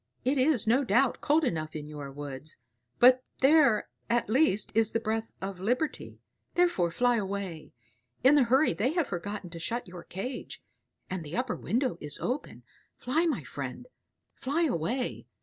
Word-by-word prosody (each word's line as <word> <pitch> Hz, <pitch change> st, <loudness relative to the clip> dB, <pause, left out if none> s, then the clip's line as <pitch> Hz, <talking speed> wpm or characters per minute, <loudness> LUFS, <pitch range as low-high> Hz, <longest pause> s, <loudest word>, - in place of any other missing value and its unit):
It 265 Hz, +2 st, +2 dB
is, 255 Hz, -4 st, +3 dB
no 245 Hz, +5 st, +3 dB
doubt, 265 Hz, 0 st, +2 dB
cold 310 Hz, +2 st, +3 dB
enough 155 Hz, -, -2 dB
in 150 Hz, -1 st, -5 dB
your 145 Hz, -2 st, -7 dB
woods, 145 Hz, +1 st, -8 dB, 0.4 s
but 255 Hz, +1 st, +6 dB, 0.2 s
there 270 Hz, -5 st, +5 dB, 0.2 s
at 235 Hz, -2 st, +1 dB
least 245 Hz, -6 st, +2 dB
is 225 Hz, -1 st, +3 dB
the 230 Hz, -, +2 dB
breath 225 Hz, 0 st, -3 dB
of 195 Hz, -1 st, -5 dB
liberty; 250 Hz, -, -2 dB, 0.4 s
therefore 345 Hz, -, +3 dB
fly 245 Hz, +7 st, +2 dB
away. 195 Hz, -6 st, -4 dB, 0.5 s
In 265 Hz, +3 st, +7 dB
the 285 Hz, -4 st, +5 dB
hurry 265 Hz, -, +3 dB
they 225 Hz, -, 0 dB
have 340 Hz, -3 st, +1 dB
forgotten 195 Hz, 0 st, -5 dB
to 165 Hz, -, -7 dB
shut 235 Hz, +7 st, -3 dB
your 180 Hz, -1 st, -9 dB
cage, 245 Hz, +8 st, -6 dB, 0.5 s
and 185 Hz, -2 st, -4 dB
the 155 Hz, +5 st, -6 dB
upper 250 Hz, -2 st, -1 dB
window 250 Hz, +3 st, -1 dB
is 150 Hz, -1 st, -2 dB
open. 260 Hz, +4 st, -4 dB, 0.3 s
Fly, 310 Hz, +8 st, +1 dB
my 320 Hz, -, -1 dB
friend; -, -, -6 dB, 0.5 s
fly 290 Hz, +6 st, -1 dB
away. 245 Hz, -, -2 dB
230 Hz, 165 wpm, -29 LUFS, 180-265 Hz, 0.5 s, In